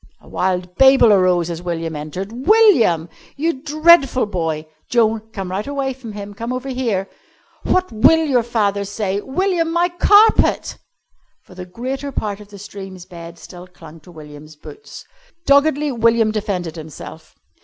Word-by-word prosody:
A - - -21
wild 180 -1 -2
babel 265 -5 +6
arose 180 -3 +2
as 170 0 -6
William 165 -2 -4
entered. 190 - -7
"William!" 340 - +4 0.3
"You 310 -2 -2
dreadful 300 -4 +4
boy!" 165 -6 -3 0.2
"Joan, 225 -2 +2
come 195 -4 -6
right 200 +5 -4
away 275 -2 -3
from 240 -4 -10
him. 205 0 -8
Come 230 +4 -6
over 255 +2 -5
here." 230 -7 -2 0.6
"What 370 -4 0
will 320 +9 +4
your 260 -5 +2
father 210 -4 -1
say?" 200 0 -3
"William, 340 - -1
my 345 +1 +1
carpet!" 410 +5 +3 0.6
For - - -17
the 180 0 -9
greater 260 +8 -5
part 210 -5 -4
of 210 - -13
the 205 0 -13
stream's 190 -2 -10
bed 170 -1 -11
still 180 +1 -12
clung 165 -3 -15
to 160 - -19
William's 155 -1 -13
boots. 420 - -13 0.4
Doggedly 285 +1 +3
William 230 -2 +2
defended 185 -6 -4
himself. 155 -2 -11
210 Hz, 155 wpm, -18 LUFS, 180-270 Hz, 0.6 s, babel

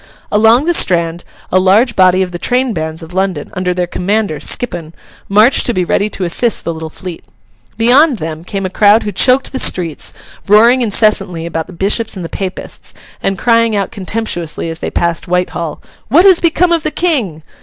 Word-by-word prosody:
Along 225 +6 +4
the 345 - +2
Strand 170 - 0 0.3
a 185 - +4
large 210 +6 +3
body 185 0 +4
of 180 - -6
the 175 - -6
train 250 +2 0
bands 160 -1 -5
of 165 +2 -11
London, 190 -5 -2
under 185 -2 -2
their 180 0 -1
commander, 195 -1 -2
Skippon, 170 -9 -2 0.3
marched 215 +6 +4
to 240 - -1
be 180 -1 0
ready 200 +4 0
to 195 - -5
assist 215 +7 0
the 170 - -3
little 160 0 -7
fleet. 175 +1 -9 0.5
Beyond 255 +5 +4
them, 160 -2 -6
came 195 +2 -4
a 185 - -4
crowd 210 +3 +4
who 210 - -3
choked 255 +7 +2
the 265 - -3
streets, 170 - 0 0.4
roaring 230 +5 +5
incessantly 200 -6 +1
about 165 -1 -4
the 185 - -12
Bishops 205 +6 -1
and 180 -3 -6
the - - -7
Papists, 190 -2 -7 0.3
and 195 - -1
crying 230 +1 +2
out 200 -1 -2
contemptuously 185 -5 -3
as 165 - -8
they - - -4
passed 170 +2 -2
Whitehall, 175 -3 -2 0.3
'What 325 - +4
has 375 -3 +6
become 340 +1 +2
of 335 -1 +2
the 310 - -1
King? 250 - -1
195 Hz, 190 wpm, -13 LUFS, 175-230 Hz, 0.5 s, has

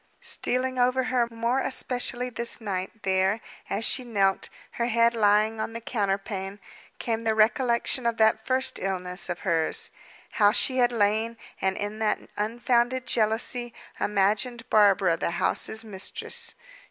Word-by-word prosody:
Stealing 255 +1 0
over 255 +1 +2
her 250 -2 0
more 235 +3 -1
especially 250 -1 0
this 235 0 +1
night, 200 0 -5
there, 190 +2 +1 0.3
as 210 +3 0
she 260 - 0
knelt, 200 -5 0 0.2
her 235 - -2
head 235 0 +3
lying 215 0 +2
on 225 - -4
the 230 - -5
counterpane, 200 -3 -3 0.4
came 225 -2 -2
the 225 -1 -1
recollection 235 +3 +1
of 230 -1 -1
that 220 0 +3
first 260 +1 0
illness 180 -1 -2
of 175 - -4
hers. 165 -5 +1 0.4
How 205 -2 +4
she 260 +4 +1
had 245 -1 +3
lain, 220 +1 0 0.2
and, 190 0 0
in 205 +1 -4
that 220 -1 +1 0.2
unfounded 240 +4 0
jealousy, 235 +2 +1 0.2
imagined 210 +4 0
Barbara 195 -5 +4
the - - -2
house's 220 +1 +2
mistress. 200 -3 -1
225 Hz, 140 wpm, -26 LUFS, 205-240 Hz, 0.4 s, How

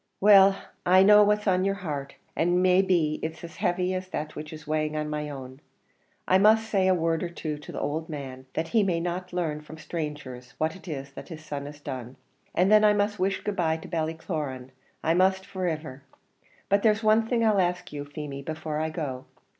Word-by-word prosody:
"Well! 195 -1 +7 0.3
I 185 +1 +6
know 210 +1 +8
what's 210 0 +2
on 185 -2 +2
your 195 0 +1
heart, 145 -8 -5 0.2
and 175 +2 +2
may 185 0 +5
be 170 -5 +1
it's 160 +2 -5
as 170 - -9
heavy 180 +1 0
as 185 0 -3
that 155 -4 -5
which 150 0 -7
is 155 -1 -10
weighing 155 0 -1
on 150 0 -2
my 150 0 -3
own. 130 -1 -9 0.7
I 185 - +5
must 220 +2 +5
say 195 -3 +2
a 185 - +4
word 165 -1 0
or 175 - -2
two 155 -3 -5
to 150 - -10
the - - -5
owld 160 +3 -3
man, 130 -3 -7
that 165 +1 -2
he 225 - +3
may 180 -4 +1
not 180 +2 -3
larn 160 -4 -2
from 150 +1 -11
sthrangers 145 -6 -6
what 160 +1 -1
it 190 -1 -14
is 140 -3 -6
his 155 -3 -10
son 145 -2 -5
has 145 0 -10
done; 130 -3 -6 0.4
and 185 +3 +3
then 215 0 +7
I 210 -1 +6
must 205 0 0
wish 190 +1 0
good 210 - -2
bye 160 -2 +1
to 160 - -10
Ballycloran 155 -5 -3 0.3
I 165 - +3
trust 190 +2 +2
for 190 -2 -2
iver! 155 -4 -5 0.7
But 200 +1 +3
there's 215 0 +3
one 220 +1 +4
thing 230 -1 +1
I'll 210 -3 +4
ask 180 -1 -2
you, 145 -1 -4
Feemy, 145 -1 -7
before 155 +1 -4
I 160 0 -1
go. 145 -6 -5
165 Hz, 215 wpm, -27 LUFS, 150-190 Hz, 0.7 s, know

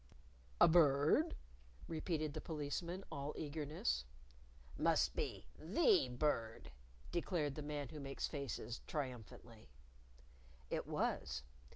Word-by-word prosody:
"A - - +9
bird?" 150 - +5 0.5
repeated 155 -2 -1
the 155 - -4
Policeman, 165 +4 -3
all 140 +2 -3
eagerness. 145 - -1 0.7
"Must - - +3
be - - -2
the 335 - +4
Bird!" 115 - -1 0.4
declared 170 -4 0
the 150 - -5
Man 145 -2 -3
Who 155 - -7
Makes 135 -1 -2
Faces, 135 -5 -4
triumphantly. 120 - -5 1.0
It - - -1
was. 65 0 -1
145 Hz, 100 wpm, -39 LUFS, 125-160 Hz, 1.0 s, A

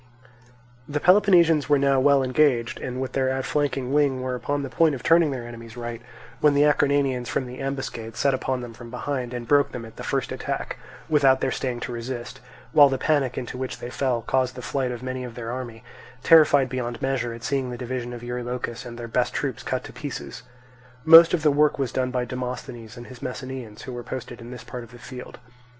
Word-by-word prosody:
The 145 0 -1
Peloponnesians 175 -5 +5
were 145 - +5
now 135 -1 +3
well 140 0 +4
engaged 130 -3 +2
and 125 0 -5
with 130 0 -3
their 130 -1 +1
outflanking 135 0 -1
wing 145 -3 +3
were 130 0 -2
upon 140 +4 -2
the 135 - -4
point 155 +3 +3
of 125 - -9
turning 165 0 +5
their 125 -4 -5
enemy's 115 0 -10
right; 120 -1 -5 0.4
when 150 -1 +4
the 145 - +5
Acarnanians 140 -4 +2
from 130 - -1
the 125 +1 -9
ambuscade 130 -4 -4
set 140 - +2
upon 130 -1 -1
them 120 -1 -8
from 120 +1 -11
behind, 125 0 -3
and 120 -1 -5
broke 145 0 +4
them 115 -2 -5
at 110 - -13
the - - -7
first - - -1
attack, - - -4 0.3
without 140 -4 +4
their - - 0
staying 125 -2 -3
to 125 - -4
resist; 120 +1 -6 0.3
while 145 -3 +7
the 135 - -1
panic 135 -3 +1
into 125 0 -5
which 130 -1 -4
they 120 - -7
fell 125 -4 -1
caused 130 +1 0
the 125 - -8
flight 130 -1 -1
of 120 0 -6
most 130 0 -4
of 120 -2 -8
their 115 -1 -5
army, 120 -3 -6 0.4
terrified 150 -4 +6
beyond 120 -2 -4
measure 130 -3 -1
at 115 0 -9
seeing 135 -1 -1
the 120 - -5
division 125 0 -4
of 120 -1 -8
Eurylochus 120 0 -4
and 120 -1 -8
their 120 -1 -6
best 115 - 0
troops - - -2
cut - - -2
to - - -10
pieces. 70 -1 -6 0.6
Most 165 +1 +10
of 165 -4 0
the 150 - +5
work 150 +1 +3
was 135 -4 -1
done 130 -1 0
by 125 -1 -1
Demosthenes 125 -2 -6
and 120 - -9
his 130 0 -12
Messenians, 130 -4 -6
who 130 - -7
were 120 - -5
posted 120 -1 -7
in 115 - -9
this 125 -1 -9
part 125 -1 -7
of 115 - -13
the 120 - -12
field. 125 +1 -9
130 Hz, 220 wpm, -24 LUFS, 120-140 Hz, 0.6 s, Most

